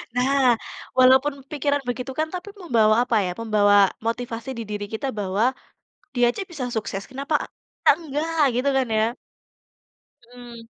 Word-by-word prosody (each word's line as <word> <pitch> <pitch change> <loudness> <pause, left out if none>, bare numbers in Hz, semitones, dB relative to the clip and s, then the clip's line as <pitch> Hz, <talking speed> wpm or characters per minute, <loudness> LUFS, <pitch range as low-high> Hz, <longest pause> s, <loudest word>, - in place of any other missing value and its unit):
Nah, 255 -1 +3 0.4
walaupun 260 +3 +5 0.2
pikiran 285 -1 0
begitu 245 +1 -3
kan, 315 - +1
tapi 365 +2 -6
membawa 235 - +3
apa 245 -2 +1
ya, 180 - -2
membawa 205 -3 +4
motivasi 230 +1 -3
di 230 - -4
diri 205 -1 -3
kita 225 +5 -3
bahwa, 210 +4 0 0.6
dia 245 -1 +4
aja 320 - -5
bisa 315 -8 -6
sukses, 210 -4 -4
kenapa 275 +4 -4 0.5
kita - - +6
enggak, 320 +1 -2 0.2
gitu 265 +3 +1
kan 265 -1 +2
ya? 225 +2 +1 1.2
Mhm. 240 -2 -11
245 Hz, 145 wpm, -23 LUFS, 225-275 Hz, 1.2 s, kita